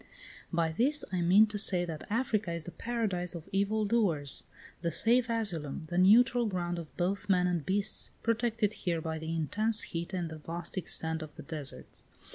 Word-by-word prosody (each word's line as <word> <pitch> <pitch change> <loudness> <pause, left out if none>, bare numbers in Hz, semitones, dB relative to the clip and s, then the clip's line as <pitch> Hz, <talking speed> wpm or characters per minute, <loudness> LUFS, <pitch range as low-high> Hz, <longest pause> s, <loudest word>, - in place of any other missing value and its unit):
By 165 -2 +1
this 270 - +2
I 180 -2 0
mean 185 +5 +6
to 210 -1 -3
say 180 -3 +4
that 160 -3 -7
Africa 215 -4 0
is 170 -1 -4
the 175 - -8
paradise 195 -7 -1
of 165 -2 -8
evil 205 +2 +1
doers, 180 -11 +1 0.4
the 170 - 0
safe 235 +7 +3
asylum, 180 -12 -2
the 175 - -2
neutral 240 +5 +5
ground 175 -3 -2
of 160 -2 -11
both 190 +3 -1
men 180 -2 +4
and 175 -3 0
beasts, 195 +6 0
protected 230 -2 0
here 170 -6 -2
by 160 0 -4
the 160 +1 -5
intense 210 +8 +1
heat 170 +1 -3
and 175 -4 -3
the 160 - -8
vast 170 +2 -4
extent 160 -3 0
of 155 -2 -9
the - - -9
deserts. 150 -4 -5
180 Hz, 185 wpm, -31 LUFS, 165-215 Hz, 0.4 s, mean